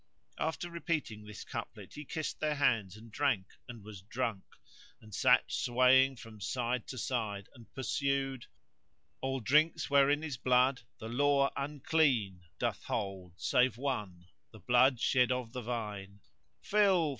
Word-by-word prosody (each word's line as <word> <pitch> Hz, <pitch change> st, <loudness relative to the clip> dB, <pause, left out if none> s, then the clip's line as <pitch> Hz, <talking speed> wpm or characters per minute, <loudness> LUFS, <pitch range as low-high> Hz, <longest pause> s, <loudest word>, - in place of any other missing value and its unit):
After 160 Hz, +2 st, -2 dB
repeating 150 Hz, -11 st, -3 dB
this 105 Hz, -1 st, -9 dB
couplet -, -, -7 dB
he 150 Hz, -, -8 dB
kissed 155 Hz, +3 st, -4 dB
their 155 Hz, -1 st, 0 dB
hands 110 Hz, -9 st, +1 dB
and 115 Hz, +1 st, -14 dB
drank 130 Hz, -8 st, +1 dB, 0.2 s
and 120 Hz, -4 st, -10 dB
was 105 Hz, -3 st, -10 dB
drunk 110 Hz, -1 st, -3 dB, 0.6 s
and 110 Hz, -1 st, -15 dB
sat -, -, +5 dB
swaying 130 Hz, +2 st, +4 dB
from 115 Hz, -4 st, -12 dB
side 120 Hz, +3 st, -2 dB
to 130 Hz, -, -7 dB
side 110 Hz, -5 st, -3 dB
and 120 Hz, -5 st, -16 dB
pursued:— 135 Hz, -1 st, -1 dB, 0.7 s
"All 135 Hz, 0 st, -1 dB
drinks 150 Hz, +7 st, +2 dB
wherein 140 Hz, +2 st, +4 dB
is 150 Hz, -5 st, -4 dB
blood 125 Hz, +1 st, +3 dB, 0.2 s
the 110 Hz, -, -6 dB
Law 140 Hz, +3 st, +2 dB
unclean 140 Hz, -, +1 dB
* -, -, -43 dB
Doth -, -, -2 dB
hold 95 Hz, -3 st, -4 dB
save 125 Hz, -3 st, +2 dB
one, 105 Hz, -10 st, -3 dB, 0.2 s
the 110 Hz, -, -14 dB
blood 125 Hz, +5 st, +4 dB
shed 125 Hz, 0 st, +3 dB
of 125 Hz, -3 st, -2 dB
the 125 Hz, -, -4 dB
vine: 105 Hz, -4 st, -5 dB, 0.4 s
Fill! 195 Hz, -6 st, +3 dB
125 Hz, 145 wpm, -32 LUFS, 110-140 Hz, 0.7 s, sat